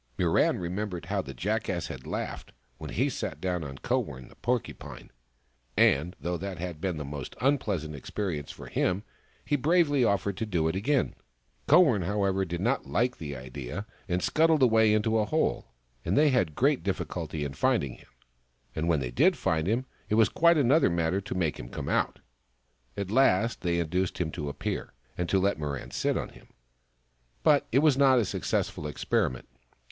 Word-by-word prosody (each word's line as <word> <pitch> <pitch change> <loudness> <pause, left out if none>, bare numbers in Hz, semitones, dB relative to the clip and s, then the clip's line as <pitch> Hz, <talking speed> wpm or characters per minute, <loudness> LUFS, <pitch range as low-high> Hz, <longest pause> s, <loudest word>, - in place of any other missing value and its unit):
Mirran - - +2
remembered 90 0 -4
how 100 +2 -1
the 70 -7 -9
Jackass 100 - -1
had 65 - -8
laughed - - -5 0.3
when - - -7
he - - 0
had - - 0
sat 75 - -4
down 90 -1 -2
on 70 -2 -7
Kowern, 65 -1 -2
the - - -18
Porcupine, 120 0 -4 0.7
and 80 +7 +3
though 85 0 -2
that 95 +1 -5
had 85 -2 -6
been 90 -5 -2
a 75 - -4
most 70 -2 -6
unpleasant 105 - 0
experience 75 +1 -4
for - - -9
him, 95 +3 0 0.4
he 145 - +1
bravely 145 -1 +3
offered 100 -3 +1
to 110 - -2
do 85 -6 +1
it 80 - -1
again. 130 +8 +1 0.5
Kowern, 135 - +6
however, 95 -1 +1
did 85 -1 -4
not - - 0
like 120 - 0
the 75 -3 -6
idea, 65 +8 -6 0.2
and 90 0 0
scuttled 160 -2 +3
away 110 -3 +5
into 110 +1 +2
a 105 - +2
hole, 155 +9 0 0.4
and 85 +4 0
they 150 0 +6
had 90 - +1
great 140 +1 +2
difficulty 85 -5 -3
in 70 - -4
finding 65 0 +1
him - - -20 0.3
— - - -39
and 80 +2 -1
when 80 -4 +2
they 60 -2 -3
did - - +3
find 80 0 0
him, 120 +5 0 0.2
it 105 - +2
was 110 -1 +5
quite 170 0 +4
another 145 - +4
matter 85 +2 0
to 95 - -6
make 85 -5 -1
him - - -7
come - - -5
out. - - +1 0.8
At 100 -1 -3
last 115 -3 +3
they 85 -1 0
induced 90 +3 -1
him 85 -4 -1
to 75 -3 -4
appear, 70 - -4 0.2
and 90 -1 -2
to 95 - +3
let 100 -2 +1
Mirran 70 -3 -4
sit - - 0
on - - -3
him. - - -17 1.0
But 150 -3 +4
it 135 +5 +3
was 150 -4 +5
not 135 -2 +6
a 115 - +3
successful 75 - -2
experiment. 65 -3 -1
95 Hz, 185 wpm, -28 LUFS, 80-115 Hz, 1.0 s, Kowern